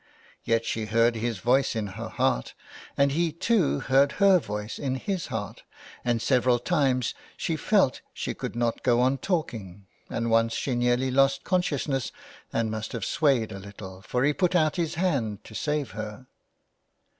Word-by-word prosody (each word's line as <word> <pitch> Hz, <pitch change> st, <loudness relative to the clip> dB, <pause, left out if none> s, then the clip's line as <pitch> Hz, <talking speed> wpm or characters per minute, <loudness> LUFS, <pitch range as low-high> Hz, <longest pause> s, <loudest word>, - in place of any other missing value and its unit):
Yet 115 Hz, 0 st, +1 dB
she 110 Hz, -1 st, -2 dB
heard 115 Hz, +2 st, +3 dB
his 115 Hz, -1 st, -2 dB
voice 125 Hz, +6 st, +2 dB
in 110 Hz, -2 st, -1 dB
her -, -, -6 dB
heart, -, -, 0 dB, 0.4 s
and 140 Hz, 0 st, +4 dB
he, 165 Hz, +3 st, +1 dB
too, 180 Hz, +1 st, +1 dB
heard 135 Hz, +1 st, +3 dB
her 195 Hz, -2 st, +5 dB
voice 105 Hz, -5 st, -5 dB
in 130 Hz, -2 st, -1 dB
his 185 Hz, +6 st, -3 dB
heart, 105 Hz, -2 st, -5 dB, 0.4 s
and 120 Hz, -1 st, +1 dB
several 125 Hz, +1 st, +3 dB
times 130 Hz, -5 st, +1 dB, 0.2 s
she -, -, -1 dB
felt -, -, +2 dB
she -, -, -4 dB
could -, -, -6 dB
not 120 Hz, -1 st, 0 dB
go 120 Hz, -1 st, +3 dB
on 130 Hz, +2 st, +2 dB
talking, 110 Hz, -, -3 dB, 0.2 s
and 115 Hz, 0 st, -2 dB
once 115 Hz, 0 st, +3 dB
she 135 Hz, -, -1 dB
nearly 120 Hz, +2 st, +1 dB
lost 135 Hz, +1 st, +3 dB
consciousness 145 Hz, -8 st, 0 dB, 0.4 s
and 115 Hz, -1 st, 0 dB
must 110 Hz, +4 st, -4 dB
have 115 Hz, -5 st, -3 dB
swayed 135 Hz, -9 st, +2 dB
a 95 Hz, -, -6 dB
little, 95 Hz, -1 st, -10 dB
for 125 Hz, +5 st, -1 dB
he 145 Hz, +2 st, +3 dB
put 180 Hz, +2 st, +1 dB
out 155 Hz, -3 st, +3 dB
his 170 Hz, -2 st, -1 dB
hand 135 Hz, -, -1 dB
to -, -, -13 dB
save 150 Hz, 0 st, -2 dB
her. 110 Hz, +3 st, -7 dB
125 Hz, 170 wpm, -26 LUFS, 110-145 Hz, 0.4 s, her